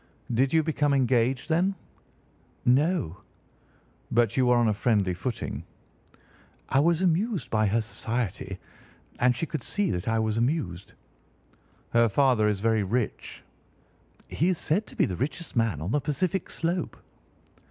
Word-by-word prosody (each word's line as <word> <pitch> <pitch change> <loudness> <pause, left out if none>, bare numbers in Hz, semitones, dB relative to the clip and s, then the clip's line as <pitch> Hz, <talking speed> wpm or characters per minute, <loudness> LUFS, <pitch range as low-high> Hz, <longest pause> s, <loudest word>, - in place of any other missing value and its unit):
"Did 130 +3 +2
you 160 -1 +3
become 145 -2 +1
engaged 130 0 +1
then?" 175 +4 +1 0.9
"No." 135 - +2 0.9
"But 115 -2 +2
you 130 -1 +3
were 125 0 +5
on 120 -1 +3
a - - +2
friendly 100 -4 +1
footing?" 105 +6 -4 1.1
"I 135 - +3
was 170 +4 +2
amused 185 +3 0
by 110 -1 +2
her 115 +3 +2
society, 110 -4 -3 0.6
and 125 0 +3
she 165 - -2
could 155 -4 -4
see 205 +4 -1
that 90 - -3
I 115 0 +1
was 110 0 0
amused." 115 - -2 1.0
"Her 115 -1 +4
father 125 -2 +3
is 105 -2 0
very 110 -1 +2
rich?" 110 +4 -3 0.8
"He 170 +5 0
is 185 - +1
said 200 +10 0
to - - -13
be - - +3
the 95 - -3
richest 150 +6 -4
man 115 - +1
on 85 +6 -3
the 145 - +1
Pacific 180 +7 -1
slope." 170 +1 -2
125 Hz, 150 wpm, -27 LUFS, 110-160 Hz, 1.1 s, were